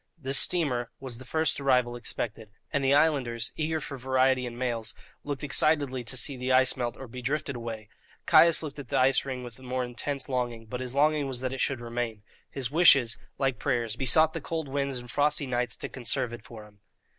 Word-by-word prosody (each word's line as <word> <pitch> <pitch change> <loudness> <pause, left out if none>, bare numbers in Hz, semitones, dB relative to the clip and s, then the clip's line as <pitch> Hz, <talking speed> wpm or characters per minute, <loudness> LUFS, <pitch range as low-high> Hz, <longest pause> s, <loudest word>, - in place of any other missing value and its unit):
This 135 -3 +3
steamer 130 -9 +2
was 125 -3 -8
the 130 - -11
first 160 +3 +1
arrival 125 -3 +2
expected, 115 -2 -4 0.2
and 140 - +1
the 135 +1 +4
islanders, 130 -7 +1
eager 160 0 -1
for 140 -2 -7
variety 130 0 +2
and 120 0 -8
mails, 120 -3 -1 0.3
looked 145 0 -5
excitedly 145 -3 +2
to 130 - -4
see 135 +2 +2
the 130 +1 -3
ice 130 0 +4
melt 120 -2 -3
or 135 - -9
be 125 +2 -8
drifted 140 +1 -2
away. 115 -2 -6 0.4
Caius 165 -1 +6
looked 145 -1 -7
at 140 - -8
the - - -1
ice 130 +1 +3
ring 130 -2 -5
with 120 0 -10
more 130 0 -3
intense 130 +3 -3
longing, 120 -4 -3
but 125 +3 -6
his 130 0 -5
longing 150 0 +2
was 130 -2 -3
that 130 0 -2
it 135 - -3
should 135 -3 0
remain. 115 -3 -4 0.3
His 130 -2 -4
wishes, 140 -8 +5 0.2
like 135 -4 0
prayers, 120 -5 -1
besought 155 +5 +4
the 165 - -4
cold 160 0 -4
winds 140 -1 -2
and 120 -1 -9
frosty 145 +1 +1
nights 125 -3 -1
to - - -4
conserve 125 0 -2
it 120 - -9
for 110 -3 -11
him. 105 -1 -20
130 Hz, 210 wpm, -28 LUFS, 120-140 Hz, 0.4 s, Caius